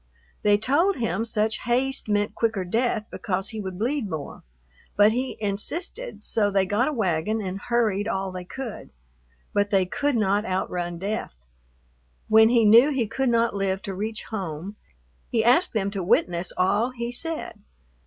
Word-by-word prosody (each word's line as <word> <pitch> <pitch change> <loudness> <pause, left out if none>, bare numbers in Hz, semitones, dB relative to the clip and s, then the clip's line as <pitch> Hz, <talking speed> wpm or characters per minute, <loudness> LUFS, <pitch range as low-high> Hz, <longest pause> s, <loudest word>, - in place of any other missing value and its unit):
They 205 -1 +4
told 310 - +2
him 225 -3 -1
such 220 -1 0
haste 255 0 0
meant 205 0 +1
quicker 225 -4 0
death 220 +2 0
because 190 +1 -2
he 220 -2 -5
would 190 -2 -6
bleed 235 +1 -1
more; 155 -4 -6 0.6
but 205 +1 +6
he 255 +3 -2
insisted, 320 - -3
so 205 -2 +2
they 195 -1 +2
got 205 +7 +1
a - - 0
wagon 215 - 0
and 195 -2 -4
hurried 220 -4 0
all 190 -3 -2
they 185 0 -6
could. 235 +4 -7 0.6
But 205 0 +1
they 195 -2 +3
could 285 +9 -1
not 205 -2 +2
outrun 180 -3 -2
death. 200 - -4 0.9
When 220 +1 +7
he 235 -2 +4
knew 230 +7 +7
he 265 -5 0
could 250 +4 -1
not 230 -2 +2
live 195 -1 -1
to 195 - -4
reach 215 +3 -4
home, 190 -2 -5 0.5
he 225 -1 +1
asked 295 +10 +4
them 200 -3 0
to 200 -1 -3
witness 175 0 +1
all 205 +6 +2
he 240 -1 -5
said. 315 -4 -3
215 Hz, 165 wpm, -25 LUFS, 195-235 Hz, 0.9 s, When